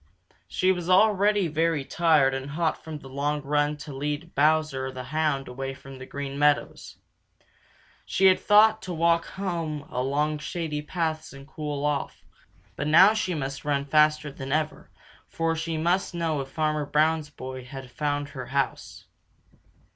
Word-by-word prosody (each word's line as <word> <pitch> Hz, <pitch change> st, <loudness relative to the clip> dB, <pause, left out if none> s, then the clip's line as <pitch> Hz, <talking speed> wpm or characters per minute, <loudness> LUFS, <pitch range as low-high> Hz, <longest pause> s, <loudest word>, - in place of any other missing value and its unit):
She 185 Hz, +1 st, +2 dB
was 175 Hz, -1 st, -3 dB
already 205 Hz, 0 st, +4 dB
very 160 Hz, -2 st, 0 dB
tired 155 Hz, -6 st, +3 dB
and 135 Hz, +1 st, -4 dB
hot 160 Hz, +2 st, -1 dB
from 160 Hz, -1 st, -6 dB
the 140 Hz, -, -12 dB
long 145 Hz, +2 st, -1 dB
run 145 Hz, +1 st, +1 dB
to 150 Hz, -1 st, -9 dB
lead 150 Hz, +5 st, -4 dB
Bowser 150 Hz, -3 st, +2 dB
the 130 Hz, -1 st, -7 dB
Hound 150 Hz, 0 st, -1 dB
away 135 Hz, +2 st, -5 dB
from 135 Hz, 0 st, -12 dB
the 130 Hz, -, -9 dB
Green 140 Hz, 0 st, -5 dB
Meadows. 145 Hz, 0 st, +1 dB, 1.1 s
She 195 Hz, -, +1 dB
had 185 Hz, -1 st, +6 dB
thought 215 Hz, +1 st, +5 dB
to 185 Hz, -4 st, -5 dB
walk 170 Hz, +1 st, +2 dB
home 165 Hz, -6 st, -4 dB
along 145 Hz, +4 st, 0 dB
shady 150 Hz, 0 st, -3 dB
paths 155 Hz, -1 st, -3 dB
and 140 Hz, 0 st, -12 dB
cool 150 Hz, -2 st, -4 dB
off, 145 Hz, -2 st, -2 dB, 0.5 s
but 145 Hz, -, -3 dB
now 185 Hz, +7 st, +7 dB
she 185 Hz, -5 st, -1 dB
must 135 Hz, -2 st, -4 dB
run 140 Hz, -1 st, 0 dB
faster 150 Hz, 0 st, +3 dB
than 135 Hz, -1 st, -7 dB
ever, 155 Hz, +1 st, -2 dB, 0.4 s
for 165 Hz, 0 st, -1 dB
she 160 Hz, 0 st, -3 dB
must 175 Hz, +3 st, 0 dB
know 160 Hz, -4 st, -1 dB
if 135 Hz, -, -8 dB
Farmer 155 Hz, 0 st, -1 dB
Brown's 155 Hz, +1 st, +1 dB
boy 130 Hz, -2 st, -8 dB
had 130 Hz, 0 st, -9 dB
found 145 Hz, 0 st, -2 dB
her 130 Hz, -4 st, -7 dB
house. 140 Hz, 0 st, -3 dB
150 Hz, 160 wpm, -26 LUFS, 140-165 Hz, 1.1 s, now